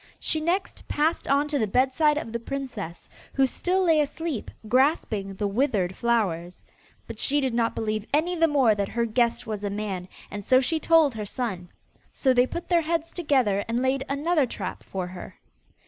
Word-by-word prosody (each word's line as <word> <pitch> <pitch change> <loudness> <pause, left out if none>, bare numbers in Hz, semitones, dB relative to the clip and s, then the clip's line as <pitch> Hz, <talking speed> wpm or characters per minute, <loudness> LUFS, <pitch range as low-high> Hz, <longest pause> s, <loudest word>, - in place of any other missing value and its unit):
She 315 - 0
next 355 +5 -2
passed 310 +3 0
on 280 +2 +2
to 290 -2 0
the 220 - +1
bedside 265 +7 +3
of 230 - -4
the 235 - -1
princess, 235 -10 -6 0.3
who 270 - +4
still 365 +8 0
lay 325 -3 +4
asleep 300 -3 -3 0.2
grasping 220 -6 +1
the 205 - -2
withered 200 -5 0
flowers. 185 -8 -1 0.4
But - - -9
she 290 +1 +2
did 265 -4 -1
not 230 -1 +1
believe 215 -1 -2
any 330 +5 +1
the 330 -1 +4
more 270 -7 +4
that 200 -1 -2
her 235 0 0
guest 235 +1 +1
was 215 -2 -4
a 205 - -1
man, 200 -3 -4 0.2
and 205 0 -5
so 255 +5 +5
she 315 +5 0
told 320 -4 +4
her 215 -2 -5
son. 195 -7 -4 0.4
So 260 -2 +2
they 250 0 +4
put 340 - -6
their 345 -2 +3
heads 330 0 -2
together 255 - +1
and 230 +1 0
laid 265 +1 +1
another 295 +1 +1
trap - - -5
for 190 -2 -4
her. 180 0 -9
255 Hz, 190 wpm, -26 LUFS, 210-300 Hz, 0.4 s, so